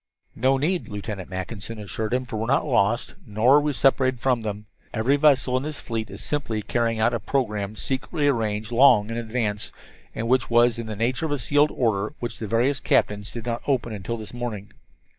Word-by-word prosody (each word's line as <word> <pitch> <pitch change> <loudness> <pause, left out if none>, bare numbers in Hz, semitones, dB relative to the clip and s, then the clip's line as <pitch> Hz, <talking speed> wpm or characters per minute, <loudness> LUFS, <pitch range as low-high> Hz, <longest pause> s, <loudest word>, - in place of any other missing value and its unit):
"No 135 +1 +2
need," 170 +6 0
Lieutenant 100 -2 -6
Mackinson 100 +4 -6
assured 105 +1 -4
him, 130 +1 0
"for 115 - -5
we 110 - -2
are - - -6
not 135 - +2
lost, 120 -4 +1
nor 115 +6 +4
are - - +4
we 150 0 0
separated 130 -1 +2
from 125 -1 +1
them. 105 -1 -5 0.3
Every 120 +6 +2
vessel 140 -3 +3
in - - -1
this 150 +1 -4
fleet 110 -3 -4
is 100 - -6
simply 115 -8 -2
carrying 115 +1 0
out 115 +2 +3
a 120 - 0
program 105 -7 -2
secretly 145 +5 -2
arranged 110 -4 0
long 115 -4 +5
in 115 - -3
advance, 110 -3 -2 0.4
and 115 - -3
which 130 +1 +2
was 120 0 +4
in 115 - -5
the 110 - -4
nature 120 +8 0
of - - -5
a 145 - +1
sealed 145 +3 +3
order 110 +1 -1
which 120 -1 -5
the 110 - -4
various 125 +6 +1
captains 105 0 +1
did 115 -1 -7
not 120 -1 -2
open 125 -5 0
until 105 +3 -4
this 110 0 -9
morning. 115 -5 -5
115 Hz, 210 wpm, -24 LUFS, 110-130 Hz, 0.4 s, long